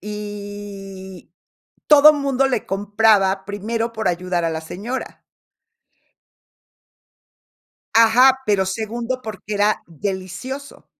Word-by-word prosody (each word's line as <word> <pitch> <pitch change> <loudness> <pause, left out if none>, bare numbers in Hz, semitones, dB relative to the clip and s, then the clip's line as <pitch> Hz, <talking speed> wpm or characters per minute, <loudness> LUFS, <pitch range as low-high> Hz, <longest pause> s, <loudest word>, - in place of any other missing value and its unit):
y 205 -3 -8 0.6
todo 300 0 +8
mundo 275 -2 +1
le 255 -4 -2
compraba, 200 -1 +2
primero, 225 +3 -3
por 220 -3 -2
ayudar 180 -1 -1
a - - +1
la 160 0 -4
señora. 205 +11 -6 2.7
Ajá, 245 +4 +6
pero 200 -2 +2
segundo 230 +6 -3
porque 215 -2 -7
era 205 +1 +1
delicioso. 190 - -6
205 Hz, 95 wpm, -20 LUFS, 190-230 Hz, 2.7 s, todo